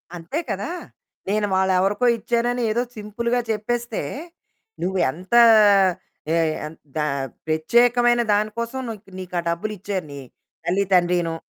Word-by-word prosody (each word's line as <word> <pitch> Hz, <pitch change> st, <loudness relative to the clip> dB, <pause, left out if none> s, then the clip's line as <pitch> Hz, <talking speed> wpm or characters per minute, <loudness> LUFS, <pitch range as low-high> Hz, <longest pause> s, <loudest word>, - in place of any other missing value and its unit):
అంతే 175 Hz, -, -4 dB
కదా! -, -, -3 dB, 0.6 s
నేను 210 Hz, 0 st, +1 dB
వాళ్ళెవరికో 190 Hz, +4 st, +2 dB
ఇచ్చానని 240 Hz, +2 st, 0 dB
ఏదో 235 Hz, +3 st, +1 dB, 0.2 s
సింపుల్‌గా 235 Hz, +4 st, -2 dB
చెప్పేస్తే, 235 Hz, +1 st, -2 dB, 0.8 s
నువ్వు 190 Hz, +2 st, -1 dB
ఎంతా 185 Hz, -, +3 dB, 0.9 s
ఏ -, -, +3 dB, 0.3 s
ఎన్ 155 Hz, +1 st, -9 dB, 0.2 s
దా 150 Hz, -, 0 dB, 0.4 s
ప్రత్యేకమైన 240 Hz, +9 st, +3 dB
దాని 210 Hz, +1 st, +1 dB
కోసం 235 Hz, +3 st, -3 dB
నూక్ 220 Hz, -2 st, -7 dB, 0.2 s
నీకు 185 Hz, -1 st, -7 dB
ఆ -, -, 0 dB
డబ్బులిచ్చారు 195 Hz, 0 st, -3 dB
నీ 140 Hz, -, -7 dB, 0.5 s
తల్లి 185 Hz, +3 st, +1 dB
తండ్రినూ. 175 Hz, -2 st, +2 dB
210 Hz, 120 wpm, -22 LUFS, 180-235 Hz, 0.9 s, ఎంతా